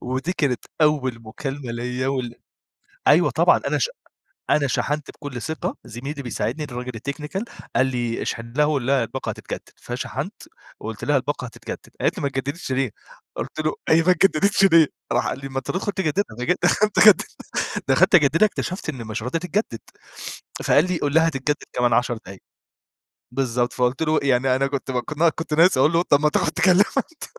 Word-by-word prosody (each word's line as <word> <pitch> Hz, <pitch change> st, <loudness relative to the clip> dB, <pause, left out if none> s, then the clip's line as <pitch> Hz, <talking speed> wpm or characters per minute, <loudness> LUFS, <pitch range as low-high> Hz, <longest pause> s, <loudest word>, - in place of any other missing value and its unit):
ودي 130 Hz, +8 st, -2 dB
كانت 135 Hz, -9 st, -1 dB, 0.2 s
أول 130 Hz, -6 st, +1 dB
مكالمة 135 Hz, +3 st, -6 dB
ليا 125 Hz, +2 st, -2 dB
وال 130 Hz, -3 st, -2 dB, 0.7 s
أيوه -, -, +6 dB
طبعًا -, -, +4 dB
أنا -, -, +1 dB
ش -, -, +1 dB, 0.6 s
أنا 145 Hz, -2 st, +3 dB
شحنت 150 Hz, +2 st, -1 dB
بكل 135 Hz, -5 st, -7 dB
ثقة 160 Hz, +4 st, -3 dB
زميلي 135 Hz, +5 st, -6 dB
بيساعدني 120 Hz, +3 st, -3 dB
الراجل 125 Hz, -2 st, -5 dB
الTechnical 150 Hz, -, -4 dB, 0.3 s
قال 130 Hz, -, +4 dB
لي 120 Hz, -3 st, -2 dB
اشحن 115 Hz, +1 st, -4 dB
لها 150 Hz, +1 st, +3 dB
وقل 145 Hz, -5 st, 0 dB
لها 135 Hz, -2 st, +3 dB
الباقة -, -, -5 dB
هتتجدد، -, -, -6 dB
فشحنت -, -, -5 dB, 0.5 s
وقلت 110 Hz, -2 st, -7 dB
لها 145 Hz, -1 st, +3 dB
الباقة 140 Hz, 0 st, -2 dB
هتتجدد 120 Hz, -, -7 dB, 0.2 s
قالت -, -, +1 dB
لي: -, -, -4 dB
"ما 140 Hz, -, +1 dB
اتجددتش 140 Hz, +3 st, -4 dB
ليه؟" 130 Hz, -3 st, 0 dB, 0.4 s
قلت -, -, -5 dB
له: 155 Hz, 0 st, 0 dB, 0.2 s
"هي 160 Hz, +1 st, +6 dB
ما 180 Hz, -, +5 dB
اتجددتش 195 Hz, +2 st, +3 dB
ليه؟" 165 Hz, -5 st, +6 dB, 0.2 s
راح -, -, +1 dB
قال -, -, -3 dB
لي 135 Hz, 0 st, -7 dB
ما 135 Hz, -, -5 dB
أنت 135 Hz, -, -4 dB
تدخل 195 Hz, +2 st, -2 dB
تجددها، 190 Hz, -, -1 dB, 0.5 s
قمت 215 Hz, 0 st, +3 dB
خد 215 Hz, -2 st, +9 dB, 0.7 s
دخلت -, -, +4 dB
أجددها 165 Hz, +4 st, +6 dB
اكتشفت 190 Hz, -3 st, -4 dB
إن 130 Hz, -7 st, -4 dB
مش 110 Hz, +1 st, -4 dB
راضية 125 Hz, +8 st, -1 dB
تتجدد 180 Hz, -, -2 dB, 0.8 s
فقال 145 Hz, -, +5 dB
لي 180 Hz, -, 0 dB
قل 145 Hz, -1 st, -1 dB
لها: 160 Hz, +1 st, +5 dB
"هتتجدد 145 Hz, -1 st, -1 dB, 0.2 s
كمان 120 Hz, -1 st, +1 dB
10 120 Hz, +1 st, +2 dB
دقايق" 100 Hz, -3 st, -11 dB, 0.9 s
بالضبط، 125 Hz, -2 st, 0 dB
فقلت 125 Hz, +3 st, 0 dB
له 155 Hz, -1 st, +2 dB
يعني 130 Hz, -1 st, +3 dB
أنا 135 Hz, +1 st, +1 dB
كنت 135 Hz, -1 st, -3 dB
كنا 150 Hz, +6 st, +1 dB
كنت 160 Hz, -1 st, -5 dB
ناقص 165 Hz, +1 st, +5 dB
أقول 150 Hz, +5 st, +4 dB
له 165 Hz, -, +4 dB
طب 145 Hz, -5 st, +3 dB
ما 150 Hz, -, +4 dB
تاخد -, -, +1 dB
تكلمها 185 Hz, +3 st, +4 dB
أنت 300 Hz, +3 st, -3 dB
140 Hz, 180 wpm, -23 LUFS, 125-160 Hz, 0.9 s, خد